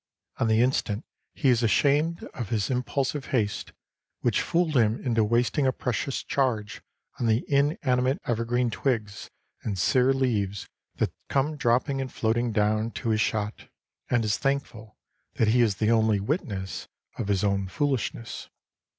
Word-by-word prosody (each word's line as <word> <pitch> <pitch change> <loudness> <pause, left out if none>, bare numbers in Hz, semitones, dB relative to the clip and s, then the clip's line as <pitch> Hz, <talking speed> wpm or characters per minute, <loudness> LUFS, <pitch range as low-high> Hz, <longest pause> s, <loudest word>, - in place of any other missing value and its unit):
On - - +1
the 110 +1 +4
instant 125 -3 0 0.3
he 135 - +2
is 120 -2 +4
ashamed 145 +8 +2
of 120 -6 -5
his 110 +1 0
impulsive 135 +3 -1
haste, 105 -6 -1 0.5
which - - +2
fooled 165 -3 0
him 115 -2 +3
into 115 -3 +2
wasting 120 +5 +2
a - - +4
precious 130 +2 -2
charge 115 -7 -1 0.4
on 120 - 0
the 110 +2 +2
inanimate 140 -2 +1
evergreen 120 +1 0
twigs 110 -6 -2 0.3
and 100 -3 -3
sere 125 +8 +3
leaves 105 -8 0 0.3
that - - -1 0.2
come 145 +3 +1
dropping 135 +1 +1
and 130 -2 -5
floating 120 +1 0
down 110 +1 +1
to 115 - -3
his 110 0 +2
shot, 105 -1 -2 0.4
and 120 -3 +2
is 105 0 0
thankful 135 -6 -3 0.4
that 110 - +2
he 120 +2 +4
is 110 -4 +3
the 105 +4 +1
only 110 -2 +3
witness 100 - -3 0.3
of - - -2
his 100 -1 +1
own 100 -1 +1
foolishness. 130 -1 -2
120 Hz, 150 wpm, -26 LUFS, 110-135 Hz, 0.5 s, the